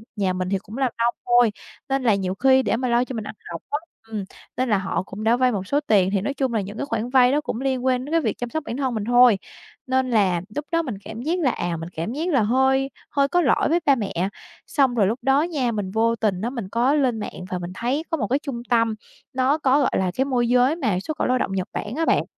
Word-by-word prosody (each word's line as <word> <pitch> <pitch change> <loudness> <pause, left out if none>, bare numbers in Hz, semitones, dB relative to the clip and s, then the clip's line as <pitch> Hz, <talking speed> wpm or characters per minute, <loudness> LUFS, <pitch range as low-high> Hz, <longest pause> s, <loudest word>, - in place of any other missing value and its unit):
nhà 195 -3 0
mình 185 0 -2
thì 195 - +1
cũng 210 +4 -10
làm 265 -3 +1
nông 235 +1 +2
thôi 240 -2 +4 0.4
nên 270 -1 0
là 220 -4 +4
nhiều 190 -1 -2
khi 265 +3 +4
để - - +1
mà 255 +1 -1
lo 240 +1 +3
cho 255 - -7
mình 220 - -3
ăn - - -7 0.2
học 165 - -6
á, 290 - 0 0.3
ừm, 215 -3 -4 0.3
nên 255 0 0
là 210 - +3
họ 190 -1 -2
cũng 200 +2 -8
đã 225 +2 +4
vay 255 -1 +3
một 195 -3 -3
số 285 - +2
tiền 190 -3 +4
thì 195 - +1
nói 275 +8 -2
chung 265 -3 -1
là 220 - +1
những 200 +3 -7
cái 280 - -2
khoản 230 -2 -2
vay 255 -1 +5
đó 295 - +2
cũng 245 -4 -4
liên 260 -2 -1
quan 255 -1 +1
đến 295 - -8
cái 330 - +3
việc 225 -7 -1
chăm 245 - -4
sóc 315 +5 -3
bản 235 - -4
thân 265 -3 -1
mình 215 -2 -2
thôi, 245 -2 +6 0.5
nên 260 0 +1
là 190 -7 +2
lúc 295 0 -3
đó 335 0 +2
mình 255 -10 -4
cảm 220 +1 -7
giác 330 +7 -1
là, 270 -8 +2
à, 175 -4 -3
mình 165 +1 -6
cảm 170 +8 -3
giác 320 +6 -2
là 270 -8 +3
hơi 265 +4 +2 0.2
hơi 280 -1 +2
có 355 +5 +2
lỗi 285 -1 +2
với 335 +3 +3
ba 275 - +5
mẹ, 210 -5 -4 0.5
xong 265 -4 +2
rồi 205 -4 +3
lúc 225 +5 -1
đó 270 +3 +3
nha 290 -8 -1
mình 205 -4 -3
vô 230 +2 +2
tình 205 -5 -1
á 230 - -1
mình 235 -7 -6
có 240 +6 +2
lên 255 -6 +1
mạng 180 -3 -6
và 180 -1 -3
mình 175 0 -6
thấy 255 +8 -1
có 325 - +1
một 215 -8 -1
cái 270 +6 +1
trung 270 -6 -5
tâm, 230 -2 +2 0.4
nó 260 +3 +2
có, 280 -2 +3
gọi 275 - +2
là, 185 -1 0
cái 265 - +1
môi 250 -3 +1
giới 250 +4 +4
mà 230 - 0
xuất 300 +10 -5
khẩu - - 0
lao 255 0 +2
động 195 - -2
Nhật 190 -1 -2
Bản 210 +5 -4
á 330 - 0
bạn. - - +3
245 Hz, 285 wpm, -23 LUFS, 210-270 Hz, 0.5 s, thôi